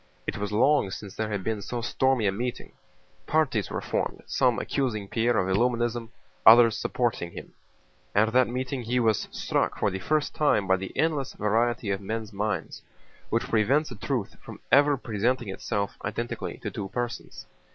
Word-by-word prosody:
It - - -3
was 105 0 -3
long 130 +1 +3
since 100 0 -8
there 110 -1 -2
had 100 -3 -3
been 110 -1 -2
so 120 +4 -4
stormy 130 -1 +1
a 95 - +3
meeting. 120 +5 -4 0.6
Parties 145 -9 +1
were - - -3
formed, - - -2
some - - +2
accusing 110 -7 -1
Pierre 115 +2 +1
of 95 - +1
Illuminism, 120 0 0 0.3
others 115 0 +8
supporting 115 -10 -1
him. - - -9 0.6
At 110 +2 +3
that 130 0 +5
meeting 130 +2 -3
he 120 +2 0
was 110 -3 +1
struck - - -1
for - - +1
the 95 - -4
first 150 +9 0
time 145 -9 +2
by 95 0 +3
the 95 0 -6
endless 150 -4 0
variety 115 0 0
of 95 0 -2
men's 110 +1 -4
minds, 105 +1 -3 0.5
which 115 - +1
prevents 135 +7 +2
a - - -6
truth 115 0 -3
from - - -10
ever 145 0 +5
presenting 120 0 -1
itself 100 +1 -3
identically 115 +4 -4
to - - -3
two 95 -1 -5
persons. 120 +1 -5
115 Hz, 170 wpm, -27 LUFS, 105-125 Hz, 0.6 s, others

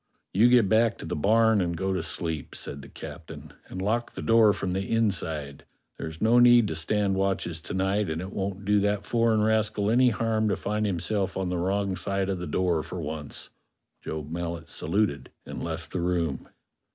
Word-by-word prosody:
"You 110 +6 +5
get 120 -4 +5
back 110 +3 +3
to - - -8
the - - -3
barn 110 +5 +3
and 85 -2 -1
go 95 +2 -1
to 95 - -1
sleep," 80 -4 -3
said 70 - -6
the 70 - -12
captain, - - -10
"and 95 - -7
lock 110 +5 -1
the - - -6
door 115 -2 +5
from 95 -2 -3
the 95 +2 -1
inside; 80 -10 -1 0.4
there's 80 0 -6
no 115 +2 +4
need 120 -2 +6
to 80 - -3
stand 100 +5 +1
watches 95 -4 -1
to 90 - -6
night, 95 +1 0
and 80 0 -2
it 95 +2 -6
won't 100 0 -4
do 105 +1 +3
that 105 0 0
foreign 115 -2 +2
rascal 110 -1 +1
any 125 +2 +5
harm 110 -1 0
to - - +1
find 105 +1 -1
himself 95 +1 -1
on 95 -1 -1
the 90 -1 -1
wrong 95 +1 0
side 100 +1 -2
of 95 -2 -2
the 90 - -5
door 85 +1 +1
for - - -7
once." 75 -2 -4 0.5
Job 75 -1 -6
Mallet 85 0 -4
saluted 100 -8 -1 0.2
and - - -6
left - - -5
the 90 - -2
room. 85 -5 -1
95 Hz, 200 wpm, -27 LUFS, 85-110 Hz, 0.5 s, need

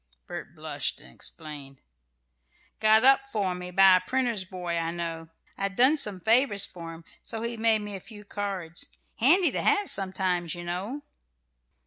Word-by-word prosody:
Bert - - -8
blushed, - - -3
and 65 - -15
explained: 145 -4 -6 1.0
"Got 220 +1 +5
up 270 0 +5
for 200 -5 0
me 180 0 -6
by 190 0 +7
a - - -2
printer's 240 0 0
boy 180 -2 -5
I 165 -1 -1
know. 165 -1 -5 0.3
I'd 195 0 -2
done 260 +7 +5
some 210 -11 0
favours 220 0 +3
for 165 -2 -8
him, 165 0 -15 0.2
so 225 -1 -5
he 235 0 -3
made 225 -1 +2
me 205 -1 -6
a - - -5
few 210 +2 -11
cards. 195 -5 -4 0.3
Handy 335 - +5
to - - -2
have 415 -2 +3
sometimes, 185 -3 0
you 175 - -7
know." 195 +12 -4
195 Hz, 165 wpm, -27 LUFS, 175-225 Hz, 1.0 s, by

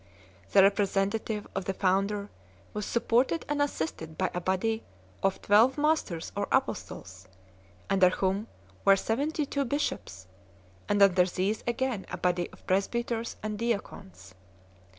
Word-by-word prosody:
The 195 - +7
representative 205 +2 +1
of 195 -1 -3
the 195 - -2
founder 200 +2 0 0.4
was 210 -1 -3
supported 245 +7 +1
and 290 0 0
assisted 160 - -3
by 185 - 0
a 180 - -2
body 205 +5 0 0.4
of 195 - +1
twelve 225 +7 +5
Masters 295 - 0
or - - -1
Apostles, 95 +1 -2 0.6
.under 190 -2 +5
whom 195 +3 -1 0.4
were 195 - +7
seventy 285 +10 -1
two 280 0 -1
bishops, 235 - -3 0.6
and 205 -1 +5
under 185 -2 +5
these 190 +4 -1
again 240 -4 -1
a 180 - -4
body 175 -1 0
of - - -18
presbyters 230 +4 -1
and 215 -1 -3
deacons. 100 - -4
200 Hz, 130 wpm, -29 LUFS, 185-235 Hz, 0.6 s, The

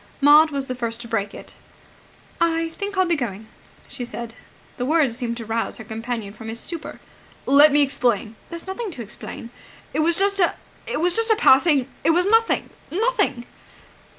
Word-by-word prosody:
Maud 295 +2 +7
was 280 -2 -3
the 255 - -4
first 235 -2 -4
to 235 - -8
break 205 -3 -2
it. - - -11 0.9
"I 330 -1 +1
think 400 +4 -6
I'll 375 - +4
be 345 -1 +1
going," 220 -7 -4 0.4
she 260 - -7
said. 235 -1 -7 0.4
The 250 - -2
words 295 -6 +2
seemed 235 -2 -3
to 230 - -7
rouse 225 +1 -2
her - - -8
companion 225 -1 -5
from 220 +1 -10
his 225 +1 -5
stupor. 335 +3 -7 0.5
"Let 285 +2 +7
me 290 +1 +5
explain!" 235 -5 0 0.2
"There's 335 -1 -6
nothing 390 +4 -4
to 240 - -6
explain." 230 +2 -9 0.4
"It - - -1
was 330 +2 +2
just 395 0 +2
a... 350 - +3 0.3
it - - -2
was 355 0 +2
just 455 0 +2
a 440 - +5
passing... 280 - +4 0.2
It 315 - +3
was 355 +2 +3
nothing... 450 +3 +2 0.2
nothing." 405 - 0
280 Hz, 185 wpm, -22 LUFS, 235-340 Hz, 0.9 s, Maud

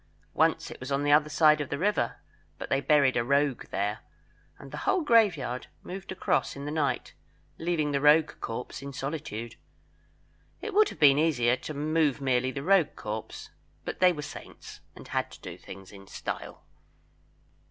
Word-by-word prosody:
Once - - +1
it - - -10
was 130 +2 -7
on 140 +1 +1
the 145 - +2
other 150 +1 +5
side 150 0 +4
of 145 - -4
the - - -2
river, 205 +2 0 0.4
but - - -7
they 135 - +2
buried 140 -3 +4
a 120 - +2
rogue 140 +1 +1
there, 105 +2 -2 0.6
and 140 - -12
the - - -6
whole 380 -2 +3
graveyard 180 - +2 0.2
moved 190 +1 -7
across 185 - 0
in 140 +1 -7
the 145 - -3
night, 150 -2 -1 0.5
leaving 160 -3 0
the 140 -1 0
rogue 150 +2 +5
corpse 115 +4 -5
in 140 0 -7
solitude. 130 -5 -5 1.0
It 435 - -6
would 430 +2 +5
have - - -11
been 145 -1 +6
easier 125 -7 +3
to 155 - -7
move 150 -1 +1
merely 130 -2 +1
the 135 +1 -5
rogue 180 -3 +3
corpse, 110 +1 -6 0.3
but - - -5
they 185 -1 +6
were 150 -4 -5
saints, - - -10 0.2
and - - -12
had - - -1
to - - -14
do - - -7
things 95 0 -12
in 100 -1 -13
style. - - -6
145 Hz, 180 wpm, -28 LUFS, 130-160 Hz, 1.0 s, been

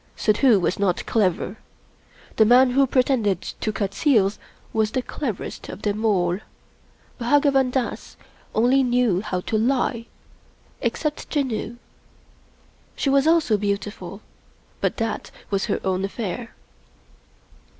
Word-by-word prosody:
Suddhoo 220 0 +3
was 180 +1 -1
not 190 -3 0
clever. 195 -1 0 0.8
The 220 - +7
man 250 +3 +6
who 270 +2 +3
pretended 245 -8 +2 0.2
to 215 - 0
cut 200 -1 -3
seals 215 -9 +2 0.3
was 220 -1 +2
the 250 +3 -2
cleverest 240 -8 -5
of - - -9
them 210 +1 -1
all 180 -4 +2 0.4
— - - -33
Bhagwan 270 +1 +3
Dass 250 -1 -3 0.4
only 250 +5 +4
knew 245 -7 +2
how 185 -4 -3
to 215 +4 -1
lie 235 -1 0 0.4
— - - -33
except 300 -2 -4
Janoo. 250 -5 -2 1.2
She 275 - 0
was 275 +2 +3
also 320 -10 +3
beau 200 0 +1
tiful, 195 -1 -9 0.6
but - - 0
that 225 -2 -3 0.2
was 195 -1 +1
her - - -1
own 190 0 0
affair. 195 -1 -4
225 Hz, 130 wpm, -23 LUFS, 200-260 Hz, 1.2 s, The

